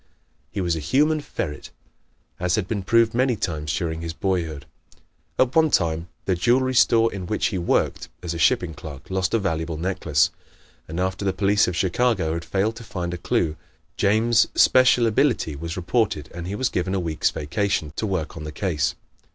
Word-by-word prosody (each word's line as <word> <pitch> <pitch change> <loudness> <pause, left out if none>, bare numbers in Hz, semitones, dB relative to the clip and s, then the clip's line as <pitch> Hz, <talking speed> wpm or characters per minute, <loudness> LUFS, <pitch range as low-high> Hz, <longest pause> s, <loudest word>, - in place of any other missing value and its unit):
He 100 - -3
was 85 -2 0
a - - -3
human 150 - +2
ferret, 75 - -5 0.7
as 90 0 +1
had 105 -4 -1
been 105 -1 -2
proven 115 +4 +3
many 130 -2 +3
times 75 -7 -3
during 80 -2 -2
his 85 -1 -4
boyhood. 80 -6 -2 0.7
At 130 -1 +2
one 160 -1 +5
time 85 - +1 0.2
the 95 - +2
jewelry 125 +9 +2
store 115 -2 +4
in 95 -3 -5
which 105 - 0
he 95 - -2
worked 85 - 0
as 85 -1 -3
a 85 - -5
shipping 80 +1 +2
clerk 75 0 -10
lost 95 +2 0
a - - +5
valuable 80 -5 -2
necklace, 80 -3 +1 0.6
and 80 +3 -5
after 95 +2 -1
the 95 -1 +1
police 100 +2 +3
of 90 - -2
Chicago 95 -3 +1
had 85 0 -3
failed 105 +4 0
to 115 - -9
find 90 -5 -4
a - - -3
clew, 80 -2 0 0.4
James' 110 +3 +3
special 130 -2 +5
ability 115 - +1
was 85 +5 -5
reported 95 - 0
and 85 0 -6
he 100 - -3
was 130 +4 0
given 95 +1 -1
a - - +1
week's 80 -3 0
vacation 80 -1 -2
to 110 - -1
work 95 -6 -2
on 80 - -7
the 75 - -6
case. 80 -3 -1
95 Hz, 190 wpm, -23 LUFS, 80-110 Hz, 0.7 s, one